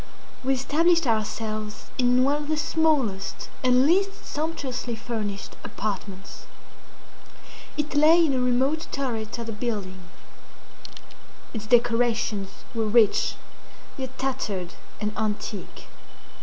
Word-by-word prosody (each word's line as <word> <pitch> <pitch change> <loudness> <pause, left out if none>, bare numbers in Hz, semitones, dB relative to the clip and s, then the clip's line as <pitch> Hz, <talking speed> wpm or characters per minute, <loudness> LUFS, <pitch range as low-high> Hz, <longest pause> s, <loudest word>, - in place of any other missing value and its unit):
We 265 +1 +2
established 330 +5 +3
ourselves 215 -2 -2
in 250 0 +4
one 280 +2 +3
of 295 - -6
the 310 0 0
smallest 290 -12 +1
and 255 +1 +5
least 390 +5 +2
sumptuously 275 -6 -3
furnished 215 -3 -4
apartments. 200 -1 -5 1.3
It 300 0 -2
lay 320 +3 +6
in 285 - +1
a 260 - +1
remote 260 +6 +1
turret 235 -5 -2
of 235 - -4
the 225 - -4
building. 210 -4 -3 1.5
Its 215 -2 -5
decorations 230 -4 +2 0.2
were 225 -2 0
rich, 220 -1 +4 0.6
yet 260 -2 -6
tattered 210 -9 -2 0.3
and 210 0 -2
antique. 210 -2 -3
245 Hz, 110 wpm, -26 LUFS, 215-280 Hz, 1.5 s, lay